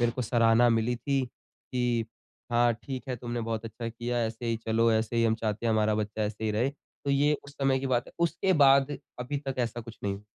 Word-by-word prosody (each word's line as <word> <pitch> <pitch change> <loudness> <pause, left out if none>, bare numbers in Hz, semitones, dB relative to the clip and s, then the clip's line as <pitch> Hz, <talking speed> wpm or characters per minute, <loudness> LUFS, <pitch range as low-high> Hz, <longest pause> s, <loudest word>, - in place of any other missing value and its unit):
मेरे 120 -1 +2
को 125 - -3
सराहना 115 +1 +4
मिली 115 +1 +1
थी 140 +2 0
की 120 -1 -3 0.5
हाँ, 120 0 +4
ठीक 130 +3 -7
है 125 - -2
तुमने 120 0 -4
बहुत 115 -1 -3
अच्छा 115 +1 -5
किया 120 +1 -2
ऐसे 115 +2 -4
ही 115 -1 +1
चलो 115 +1 +3
ऐसे 110 +1 0
ही 115 - +3
हम 110 0 +3
चाहते 110 0 -2
हैं 110 - +3
हमारा 110 0 +2
बच्चा 105 0 -2
ऐसे 105 +1 -3
ही 110 - +1
रहे। 115 +6 +1
तो 140 0 -8
ये 145 +2 +3
उस 140 - -12
समय 135 -1 +1
की 135 - -2
बात 120 -1 +1
है, - - -13
उसके 170 +3 +1
बाद 140 -2 +5 0.2
अभी 130 +4 -3
तक 135 - -1
ऐसा 120 -1 -1
कुछ 115 0 -11
नहीं। 100 -1 -2
120 Hz, 230 wpm, -28 LUFS, 115-130 Hz, 0.5 s, बाद